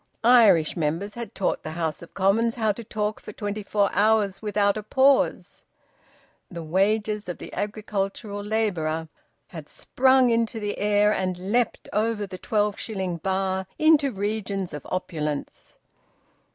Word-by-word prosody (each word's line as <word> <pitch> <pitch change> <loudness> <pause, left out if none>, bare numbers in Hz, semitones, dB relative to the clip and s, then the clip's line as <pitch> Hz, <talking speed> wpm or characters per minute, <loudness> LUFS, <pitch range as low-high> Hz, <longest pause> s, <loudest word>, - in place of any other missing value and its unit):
Irish 220 -10 +5
members 170 +6 -2
had 235 -1 -7
taught 190 - -1
the 155 - -6
House 160 -2 -2
of 170 - -13
Commons 220 +5 +2
how 220 -3 +1
to 230 +3 -7
talk 215 0 -3
for - - -10
twenty 205 0 -4
four 205 0 +1
hours 205 -1 +2
without 205 -1 +1
a 215 - -3
pause. 265 +5 +2 0.9
The 170 -2 -7
wages 205 +4 0
of 175 - -4
the - - -10
agricultural 205 0 -3
labourer 170 -7 -1 0.4
had - - -9
sprung 260 -1 +3
into 230 0 0
the 205 -1 -4
air 210 0 +3
and 185 0 -3
leaped 245 -1 0
over 215 0 0
the 185 -2 -9
twelve 210 0 0
shilling 190 -5 -3
bar 190 +1 -1
into 310 -3 +4
regions 200 -3 -3
of 150 - -7
opulence. 150 -5 -4
205 Hz, 145 wpm, -25 LUFS, 190-220 Hz, 0.9 s, Irish